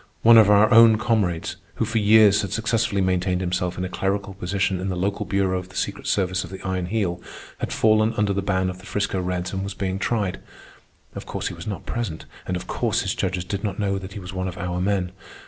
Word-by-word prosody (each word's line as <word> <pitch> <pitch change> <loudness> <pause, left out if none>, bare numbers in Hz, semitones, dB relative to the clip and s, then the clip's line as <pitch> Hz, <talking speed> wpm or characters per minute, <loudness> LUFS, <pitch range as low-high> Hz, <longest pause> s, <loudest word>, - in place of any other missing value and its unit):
One 115 0 +9
of 105 -2 +6
our 105 +2 +5
own 115 -1 +8
comrades, 105 -8 0 0.2
who - - 0
for 110 0 0
years 105 -1 +6
had 100 - -4
successfully 110 -2 0
maintained 90 0 +1
himself 90 -1 -2
in 90 - -2
a - - -2
clerical 95 +2 -2
position 95 0 -1
in 95 +1 -3
the 95 - -2
local 100 +3 -2
bureau 95 -2 +1
of 90 0 -10
the 95 - -16
secret - - -3
service 95 -1 0
of 90 - -9
the 95 0 -8
Iron 95 -2 -2
Heel, 90 -4 -1 0.4
had - - -3
fallen 110 0 +3
under 105 -1 +2
the 100 - -1
ban 95 -1 0
of 90 - -11
the 95 - -13
'Frisco 100 -2 -1
Reds 90 0 -3
and 95 0 -2
was 100 -1 -5
being 95 0 -2
tried. 100 -3 -1 0.7
Of - - -8
course - - -3
he - - -7
was 85 +2 -9
not 100 -3 -5
present, 115 -10 -4 0.2
and 90 - -1
of 90 - -7
course - - 0
his - - -1
judges 90 -1 -2
did 100 +2 -4
not 100 -3 -2
know 100 -2 -1
that 95 0 -9
he 105 - -6
was 90 0 -8
one 95 0 -2
of 90 0 -6
our 90 -1 -3
men. 95 -2 0
95 Hz, 240 wpm, -23 LUFS, 90-105 Hz, 0.7 s, One